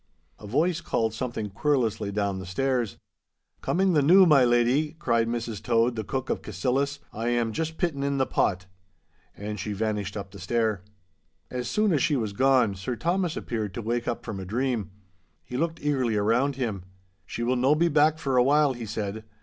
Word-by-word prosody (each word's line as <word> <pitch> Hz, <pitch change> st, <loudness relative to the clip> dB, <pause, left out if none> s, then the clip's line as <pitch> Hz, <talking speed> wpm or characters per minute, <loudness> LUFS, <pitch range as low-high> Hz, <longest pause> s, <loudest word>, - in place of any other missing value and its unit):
A 105 Hz, -, -10 dB
voice 160 Hz, -, +1 dB
called 115 Hz, -9 st, -1 dB
something 110 Hz, -3 st, -4 dB
querulously 110 Hz, -3 st, 0 dB
down 100 Hz, -2 st, -1 dB
the 95 Hz, -, -7 dB
stairs. 125 Hz, +3 st, -1 dB, 0.6 s
'Coming 190 Hz, 0 st, +1 dB
the 150 Hz, -, +4 dB
noo, 185 Hz, +7 st, +7 dB
my 150 Hz, -6 st, +6 dB
leddy,' 120 Hz, +5 st, +2 dB
cried 115 Hz, -8 st, +1 dB
Mrs 115 Hz, -3 st, -3 dB
Tode, 115 Hz, +2 st, +2 dB
the 110 Hz, -, -3 dB
cook 130 Hz, +4 st, -3 dB
of -, -, -2 dB
Cassillis, 140 Hz, +3 st, -1 dB, 0.2 s
'I 115 Hz, +2 st, -3 dB
am 120 Hz, -2 st, 0 dB
juist 160 Hz, +4 st, -3 dB
pittin' 150 Hz, -6 st, -1 dB
on 140 Hz, 0 st, 0 dB
the 135 Hz, -, +2 dB
pot—' 90 Hz, -6 st, 0 dB, 0.7 s
And 105 Hz, 0 st, -5 dB
she 105 Hz, +2 st, -3 dB
vanished 105 Hz, -1 st, -2 dB
up 100 Hz, -2 st, -6 dB
the -, -, -11 dB
stair. 110 Hz, +1 st, 0 dB, 0.7 s
As 125 Hz, -1 st, -3 dB
soon 210 Hz, -, +2 dB
as 145 Hz, -, +2 dB
she 150 Hz, -, +2 dB
was 110 Hz, -6 st, -2 dB
gone, 130 Hz, -3 st, +3 dB
Sir 95 Hz, +6 st, -4 dB
Thomas 175 Hz, -, -1 dB
appeared 110 Hz, -, -4 dB
to 120 Hz, -, -4 dB
wake 120 Hz, +2 st, -2 dB
up 120 Hz, -, -3 dB
from 105 Hz, -4 st, -5 dB
a -, -, -5 dB
dream. 120 Hz, 0 st, -1 dB, 0.5 s
He 125 Hz, -, -8 dB
looked 165 Hz, +4 st, -1 dB
eagerly 130 Hz, -6 st, +1 dB
around 115 Hz, +7 st, +2 dB
him. 115 Hz, -8 st, -3 dB, 0.5 s
'She 120 Hz, -, -4 dB
will 125 Hz, +2 st, +1 dB
no 130 Hz, +4 st, +3 dB
be 170 Hz, +3 st, +3 dB
back 155 Hz, 0 st, +3 dB
for 135 Hz, -4 st, -1 dB
a 125 Hz, -, +6 dB
while,' 145 Hz, +1 st, +3 dB
he 120 Hz, -3 st, -7 dB
said. 110 Hz, 0 st, -4 dB
120 Hz, 195 wpm, -26 LUFS, 110-140 Hz, 0.7 s, noo